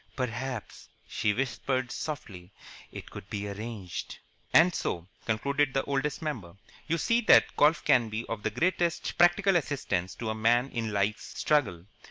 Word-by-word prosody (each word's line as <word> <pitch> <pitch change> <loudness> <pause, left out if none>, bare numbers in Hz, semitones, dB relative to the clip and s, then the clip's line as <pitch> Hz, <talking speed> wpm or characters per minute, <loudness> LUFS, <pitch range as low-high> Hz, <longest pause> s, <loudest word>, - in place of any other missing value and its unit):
"Perhaps," 125 -2 -4 0.2
she 105 - 0
whispered, 130 +1 -1
softly, 100 - -6 0.4
"it - - -9
could 100 - -10
be 105 -1 -4
arranged." 100 -3 -6 0.3
"And 175 +2 +6
so," 85 - -3 0.2
(concluded 140 +5 0
the 135 - +2
Oldest 140 +2 -2
Member), 110 - -5 0.3
"you 165 +1 +1
see 230 +8 +2
that 215 - +5
golf 155 +2 +3
can 120 -3 +4
be 110 +2 -4
of 115 -2 -5
the 110 - 0
greatest 170 - 0
practical 175 +3 +5
assistance 115 - -1
to 110 -2 -3
a - - -1
man 120 +4 +2
in 115 -2 -2
Life's 100 +1 -2
struggle. 110 - +1
120 Hz, 155 wpm, -29 LUFS, 105-150 Hz, 0.4 s, And